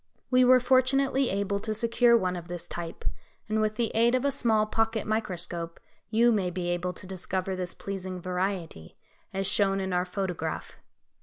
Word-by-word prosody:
We 255 Hz, 0 st, +6 dB
were 255 Hz, 0 st, +7 dB
fortunately 260 Hz, +1 st, +3 dB
able 200 Hz, +1 st, -1 dB
to 215 Hz, +1 st, -3 dB
secure 235 Hz, +1 st, +4 dB
one 185 Hz, -4 st, -1 dB
of 170 Hz, -1 st, -7 dB
this 175 Hz, -1 st, -6 dB
type; 170 Hz, -1 st, -6 dB, 0.4 s
and 215 Hz, 0 st, 0 dB
with 215 Hz, 0 st, 0 dB
the 230 Hz, 0 st, 0 dB
aid 235 Hz, +2 st, +4 dB
of 255 Hz, -, 0 dB
a 280 Hz, -, +3 dB
small 225 Hz, -5 st, +2 dB
pocket 225 Hz, +1 st, 0 dB
microscope, 175 Hz, -6 st, -2 dB, 0.3 s
you 235 Hz, +2 st, +4 dB
may 195 Hz, -5 st, +1 dB
be 175 Hz, 0 st, -3 dB
able 175 Hz, +1 st, -1 dB
to 185 Hz, -, -11 dB
discover 185 Hz, 0 st, -3 dB
this 180 Hz, -1 st, -3 dB
pleasing 185 Hz, -2 st, -5 dB
variety, 180 Hz, -, -3 dB, 0.3 s
as 195 Hz, 0 st, -2 dB
shown 195 Hz, 0 st, +3 dB
in 190 Hz, -1 st, -2 dB
our 180 Hz, 0 st, +1 dB
photograph. 180 Hz, -4 st, -4 dB
195 Hz, 175 wpm, -28 LUFS, 180-230 Hz, 0.4 s, were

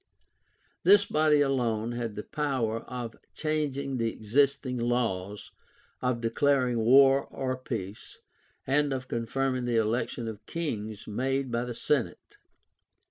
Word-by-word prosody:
This 205 Hz, +2 st, +6 dB
body 150 Hz, -1 st, +3 dB
alone 120 Hz, -5 st, 0 dB
had 120 Hz, -3 st, -4 dB
the 105 Hz, -, -5 dB
power 130 Hz, -7 st, -1 dB
of 120 Hz, -3 st, -5 dB, 0.2 s
changing 140 Hz, -3 st, -1 dB
the 115 Hz, -1 st, 0 dB
existing 130 Hz, +4 st, +1 dB
laws; 110 Hz, -5 st, -2 dB, 0.5 s
of 125 Hz, -2 st, 0 dB
declaring 125 Hz, 0 st, +2 dB
war 135 Hz, +4 st, +6 dB
or 130 Hz, -1 st, -3 dB
peace; 110 Hz, -6 st, -6 dB, 0.5 s
and 145 Hz, +1 st, +2 dB
of 130 Hz, -1 st, -4 dB
confirming 130 Hz, +2 st, -1 dB
the 120 Hz, -1 st, +1 dB
election 115 Hz, +1 st, -1 dB
of 110 Hz, -2 st, -7 dB
kings 110 Hz, -11 st, -4 dB
made 130 Hz, +4 st, -1 dB
by 120 Hz, +1 st, -1 dB
the 120 Hz, -1 st, -5 dB
senate. 140 Hz, 0 st, -2 dB
125 Hz, 125 wpm, -28 LUFS, 115-140 Hz, 0.5 s, This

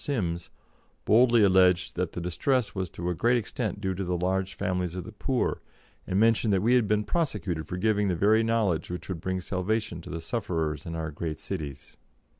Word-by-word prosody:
Sims 90 Hz, -, -2 dB, 0.6 s
boldly 120 Hz, 0 st, +5 dB
alleged 95 Hz, -2 st, +4 dB
that -, -, -2 dB
the 90 Hz, -, -4 dB
distress 115 Hz, +7 st, 0 dB
was 95 Hz, -3 st, -3 dB
to 85 Hz, +1 st, -6 dB
a -, -, 0 dB
great 120 Hz, +8 st, +2 dB
extent 110 Hz, -1 st, -3 dB
due 95 Hz, -2 st, -1 dB
to 95 Hz, +2 st, -3 dB
the 90 Hz, -1 st, -1 dB
large 95 Hz, +2 st, -1 dB
families 90 Hz, -3 st, -2 dB
of 90 Hz, -, -4 dB
the 110 Hz, -, -9 dB
poor, 125 Hz, +4 st, -1 dB, 0.5 s
and 95 Hz, -, +1 dB
mentioned 115 Hz, 0 st, +3 dB
that 95 Hz, 0 st, +2 dB
we 120 Hz, +3 st, +4 dB
had 125 Hz, -4 st, +4 dB
been 105 Hz, +1 st, +2 dB
prosecuted 105 Hz, -, -2 dB
for 90 Hz, -, -4 dB
giving 105 Hz, +1 st, +2 dB
the 90 Hz, -, +1 dB
very 105 Hz, +6 st, +4 dB
knowledge 110 Hz, -8 st, +1 dB
which 90 Hz, +2 st, -6 dB
would 85 Hz, -4 st, -4 dB
bring 95 Hz, +1 st, -1 dB
salvation 95 Hz, 0 st, -2 dB
to -, -, -11 dB
the 85 Hz, -, -4 dB
sufferers 80 Hz, -, -2 dB
in 85 Hz, -, -4 dB
our 80 Hz, -1 st, -3 dB
great 80 Hz, 0 st, -4 dB
cities. 75 Hz, -8 st, -6 dB
95 Hz, 205 wpm, -27 LUFS, 85-110 Hz, 0.6 s, boldly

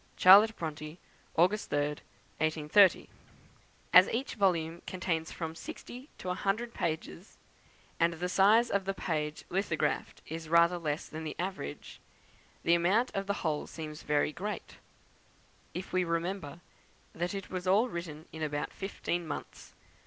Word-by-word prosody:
C. -, -, -6 dB, 0.3 s
BRONTE, 155 Hz, 0 st, -5 dB, 0.4 s
August 185 Hz, +6 st, +2 dB
3, -, -, 0 dB, 0.6 s
1830 155 Hz, +4 st, +4 dB, 0.9 s
As 180 Hz, +1 st, +9 dB
each 255 Hz, +4 st, -2 dB
volume 170 Hz, -5 st, +1 dB
contains 170 Hz, -3 st, -2 dB
from 160 Hz, -1 st, -5 dB
sixty 250 Hz, -, -9 dB
to 180 Hz, -, -4 dB
a -, -, +1 dB
hundred 215 Hz, +5 st, -1 dB
pages, 165 Hz, +3 st, -4 dB, 0.6 s
and 170 Hz, 0 st, +3 dB
the 175 Hz, +2 st, -3 dB
size 210 Hz, +6 st, +4 dB
of 200 Hz, -1 st, 0 dB
the 195 Hz, 0 st, -2 dB
page 155 Hz, -4 st, -3 dB
lithographed 185 Hz, -4 st, -1 dB
is 160 Hz, 0 st, -7 dB
rather 170 Hz, +1 st, +5 dB
less 150 Hz, -2 st, -3 dB
than 160 Hz, +1 st, -7 dB
the 155 Hz, -, -5 dB
average, 180 Hz, -, -5 dB, 0.6 s
the 170 Hz, -, +4 dB
amount 190 Hz, +9 st, +3 dB
of 195 Hz, 0 st, -2 dB
the 200 Hz, -, -2 dB
whole 150 Hz, -2 st, -1 dB
seems 155 Hz, -2 st, -7 dB
very 150 Hz, 0 st, +1 dB
great, 205 Hz, +5 st, -5 dB, 1.0 s
if 185 Hz, -, -6 dB
we 185 Hz, 0 st, +3 dB
remember 170 Hz, -1 st, -3 dB, 0.5 s
that 175 Hz, +3 st, -3 dB
it 195 Hz, -, -6 dB
was 185 Hz, -1 st, -4 dB
all 205 Hz, +6 st, +4 dB
written 170 Hz, -6 st, -6 dB
in 160 Hz, -, -8 dB
about 150 Hz, -1 st, -2 dB
fifteen 175 Hz, -3 st, -3 dB
months. -, -, -7 dB
175 Hz, 145 wpm, -31 LUFS, 160-195 Hz, 1.0 s, As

